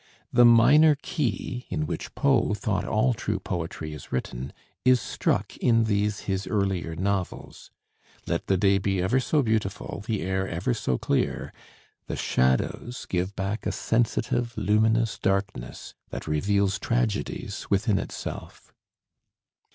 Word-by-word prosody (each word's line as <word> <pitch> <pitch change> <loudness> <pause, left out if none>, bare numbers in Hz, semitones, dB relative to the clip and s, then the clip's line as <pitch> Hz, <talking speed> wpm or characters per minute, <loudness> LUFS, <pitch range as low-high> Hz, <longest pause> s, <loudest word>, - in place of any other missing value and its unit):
The 120 0 +7
minor 145 +7 +7
key, 125 - -3
in 155 - -1
which - - -5
Poe 130 -7 +2
thought 100 -2 -1
all 115 +4 +2
true 115 - -2
poetry 85 -4 -4
is 75 - -10
written, 65 0 -3 0.3
is 130 -1 +5
struck - - -1
in 115 -2 +3
these 105 -1 0
his 95 -1 -2
earlier 95 -6 -1
novels. 95 +1 -3 0.6
Let - - -2
the 95 - +3
day 100 +1 +3
be 95 0 0
ever 95 +9 +2
so 145 +3 +1
beautiful, 105 -3 -2
the 110 -7 -1
air 95 +1 -1
ever 90 +10 -1
so 65 - -1
clear, - - -1 0.5
the - - -3
shadows 65 - 0
give 95 +2 -2
back 100 +3 -3
a - - +1
sensitive, 115 0 0
luminous 110 +2 +2
darkness 95 -10 -2 0.2
that - - -6
reveals 100 +5 +1
tragedies 115 -4 -2
within - - +2
itself. - - -7
105 Hz, 135 wpm, -26 LUFS, 95-115 Hz, 0.6 s, The